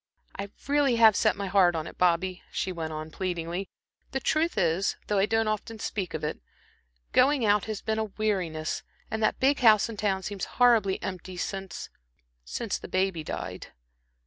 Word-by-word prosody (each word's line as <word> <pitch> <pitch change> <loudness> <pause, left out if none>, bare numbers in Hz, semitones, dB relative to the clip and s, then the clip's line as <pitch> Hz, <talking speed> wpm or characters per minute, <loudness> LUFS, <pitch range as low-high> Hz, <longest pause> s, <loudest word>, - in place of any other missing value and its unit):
I 200 0 -5 0.2
really 280 -3 +3
have 225 -3 +7
set - - +3
my 200 0 -4
heart 185 -2 +4
on 160 -1 -2
it, - - -10
Bobby," 180 +1 +2
she 190 - -2
went 165 -3 -4
on, 155 0 -6
pleadingly. 175 +1 -3 0.4
"The 270 - 0
truth 320 +5 +1
is, 175 +3 +1
though 205 -1 +1
I 195 - +3
don't 225 0 +1
often 215 +2 -3
speak 190 -5 -3
of 155 - -4
it, 150 - -2 0.7
going 265 -1 +4
out 205 -1 +3
has 215 -2 -5
been 220 0 0
a 220 - 0
weariness, 190 -7 -2 0.3
and 220 - -2
that 215 - +1
big 275 +2 +3
house 220 -2 +6
in 225 - -7
town 195 -2 0
seems 200 0 -4
horribly 230 -6 +4
empty 185 0 -5
since 195 0 -5 0.5
since - - -3
the - - -8
baby 185 -3 0
died." - - -6
195 Hz, 180 wpm, -28 LUFS, 175-220 Hz, 0.7 s, have